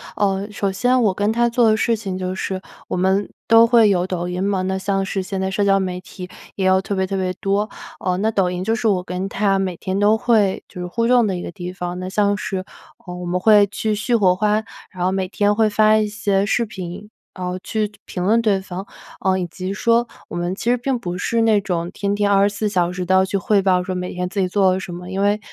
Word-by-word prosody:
呃， 195 -1 0
首 200 -1 -1
先 245 +6 +2
我 205 -4 +3
跟 205 +3 0
他 235 +1 +2
做 235 -1 +3
的 215 - +4
事 230 +1 +1
情 195 -4 -5
就 185 0 -3
是- 190 0 -4 0.3
我 - - -3
们 190 +2 +1 0.2
都 230 0 +6
会 230 -3 +5
有 180 -2 +1
抖 180 -1 -3
音 180 +1 -3
嘛。 195 -1 0
那 190 +1 -1
像 195 0 -1
是 195 0 -2
现 190 0 -4
在 190 0 -1
社 200 +1 0
交 195 -1 +3
媒 180 -1 -3
体 180 0 -10 0.3
也 190 - -1
有 190 0 +4
特 200 +1 -3
别 190 0 +1
特 195 +1 -3
别 185 -1 -1
多， 200 +3 -1 0.3
呃， 180 -1 -1
那 220 +2 +1
抖 195 -4 +1
音 180 0 -3
就 225 +4 0
是 230 -1 0
我 185 -3 +1
跟 180 +1 -4
他 195 -1 +1
每 185 -2 -2
天 190 +3 -3
都 210 +2 +4
会， 220 -5 +2
就 180 - -10
是 180 - -4
互动 235 +3 +2
的 190 - -1
一 175 - -4
个 - - -6
地 180 0 -7
方。 180 0 -5
那 185 - -5
像 205 +1 +1
是， 190 -3 -3 0.4
呃， 180 - -7
我 180 0 -6
们 175 +1 -1
会 205 +1 +5
去 215 +2 -2
续 220 +3 0
火 190 -5 +4
花， 210 +3 +1 0.3
然 180 -2 -5
后 185 - +2
每 190 -1 -1
天 205 +2 +1
会 215 0 +2
发 215 +1 +4
一 215 -1 +1
些 200 -2 0
视 235 +3 +1
频， 195 -1 -8 0.3
呃， 180 -1 -4
去 215 -1 -1
就 210 - -22
评 180 - -4
论 225 +4 +3
对 210 -4 +2
方， 190 0 -7 0.4
呃， 190 0 +2
以 180 - -1
及 185 +2 -6
说 235 +3 +2 0.2
我 - - -8
们 175 +1 -2
其 230 - -2
实 - - +4
并 255 +2 -1
不 180 -4 -4
是 230 +5 0
那 220 -2 +3
种 175 -3 -2
天 200 0 -1
天 205 0 +1
24 200 +1 +2
小 180 -4 +1
时 180 0 -4
都 185 - +1
要 190 - +5
去 195 +1 -1
汇 200 +1 +2
报 185 -2 +2
说 185 0 -4
每 180 0 -4
天 180 0 -2
自 195 +2 -4
己 185 - +1
做 190 0 +3
了 185 - -1
什 190 - -7
么。 180 +1 -8
因 195 - -2
为， 205 +1 +2
195 Hz, 280 characters per minute, -20 LUFS, 185-210 Hz, 0.4 s, 都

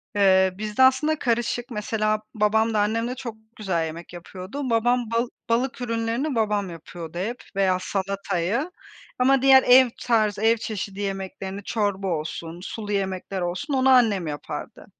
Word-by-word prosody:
Eee, 190 -2 +4
bizde 215 +4 +1
aslında 300 +4 +3
karışık, 240 +1 -1
mesela, 215 0 -1
babam 220 +1 +2
da 215 - +2
annem 225 +3 +1
de 250 - -4
çok 240 -4 -6 0.2
güzel 185 -6 -1
yemek 165 +2 -8
yapıyordu. 190 +10 -6
Babam 235 0 +1
bal 235 +1 +1 0.2
balık 250 +2 0
ürünlerini 230 +4 -1
babam 210 -3 0
yapıyordu 165 0 -9
hep 230 +7 -3
veya 190 -2 +2
salatayı, 195 - -2 0.5
ama 265 +1 +4
diğer 265 0 +7
ev 255 0 +7
tarzı, 215 -4 +1
ev 225 +1 +4
çeşidi 205 -2 -5
yemeklerini, 195 0 -5
çorba 200 -3 -1
olsun, 165 0 -4
sulu 210 0 -6
yemekler 190 -1 -2
olsun, 185 - -3
onu 265 0 +3
annem 215 -9 +4
yapardı. 145 -1 -6
215 Hz, 150 wpm, -24 LUFS, 190-240 Hz, 0.5 s, diğer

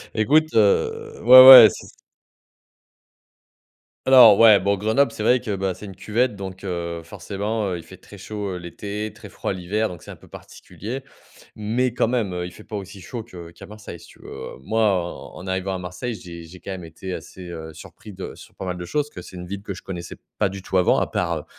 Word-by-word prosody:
Écoute, 155 +8 +2
heu, 105 -3 +1
ouais, 130 +2 +10
ouais, 125 -4 +13
c'est - - -10 2.2
Alors, 120 -6 +8
ouais, 110 -3 +7
bon, 100 +1 0
Grenoble, 110 +8 +1
c'est - - -8
vrai 125 +3 +3
que, 110 -5 -4
bah, 95 -1 -2
c'est 105 - -11
une 95 -2 -10
cuvette, 115 +3 -1
donc 95 -1 -8
heu, 85 -2 -4
forcément, 100 +4 -4
heu, 90 - -3
il 85 - -10
fait - - -14
très - - -15
chaud, 105 -2 -6
heu, - - -5
l'été, 100 +5 -6
très 105 -1 -13
froid - - -4
l'hiver, 100 +5 -2
donc 90 -2 -10
c'est - - -14
un - - -8
peu - - -19
particulier. 130 +6 -9 0.5
Mais 115 +4 -1
quand 120 - +1
même, 115 -6 -1
heu, 90 0 -4
il - - -10
fait 105 - -14
pas 110 - -8
aussi 100 0 -8
chaud 115 +5 -7
que 85 -7 -12
qu'à - - -13
Marseille, 105 -5 -10
si 85 - -16
tu - - -19
veux. - - -9
Moi, 110 +11 -1
en 95 -5 -1
en 90 - -10
arrivant 95 +1 -2
à - - -3
Marseille, 90 +7 -6
j'ai 85 -4 -10
j'ai 90 +2 -13
quand - - -8
même 95 -2 -7
été 85 +3 -8
assez, 95 - -9
heu, 80 -2 -8
surpris 105 +6 -13
de 95 0 -8
sur - - -16
pas - - -7
mal 90 -1 -4
de 90 - -7
choses, 150 +10 -1
que 90 - -9
c'est 90 - -13
une 90 0 -7
ville 100 +1 -6
que 100 -3 -7
je - - -12
connaissais 90 -2 -7 0.2
pas 105 - +2
du 95 0 -9
tout 95 - -1
avant, 90 - +3
à - - 0
part, - - -2
100 Hz, 230 wpm, -22 LUFS, 90-110 Hz, 2.2 s, ouais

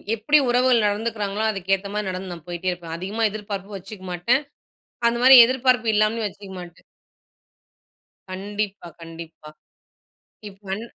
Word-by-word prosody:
எப்டி 260 +8 +3
உறவுகள் 245 -2 +3
நடந்துக்கிறாங்களோ! 210 -1 -2
அதுக்கு 195 -1 -2
ஏத்தமாரி 200 +1 -5
நடந்து 185 0 -5
நான் 165 -3 -12
போயிட்டே 175 +1 -3
இருப்பேன். 165 -2 -7
அதிகமா 210 +5 -2
எதிர்பார்ப்பு 205 -1 -6
வச்சுக்க 195 0 -11
மாட்டேன். 240 - +1 0.7
அந்தமாரி 250 +3 +7
எதிர்பார்ப்பு 255 -2 +1
இல்லாமலும் 215 +1 +1
வச்சுக்க 200 0 -12
மாட்டேன். 175 -1 -13 1.5
கண்டிப்பா, 200 -1 -5
கண்டிப்பா. 165 -2 -11 1.0
இப்பன் 195 +2 -7
205 Hz, 115 wpm, -23 LUFS, 185-225 Hz, 1.5 s, அந்தமாரி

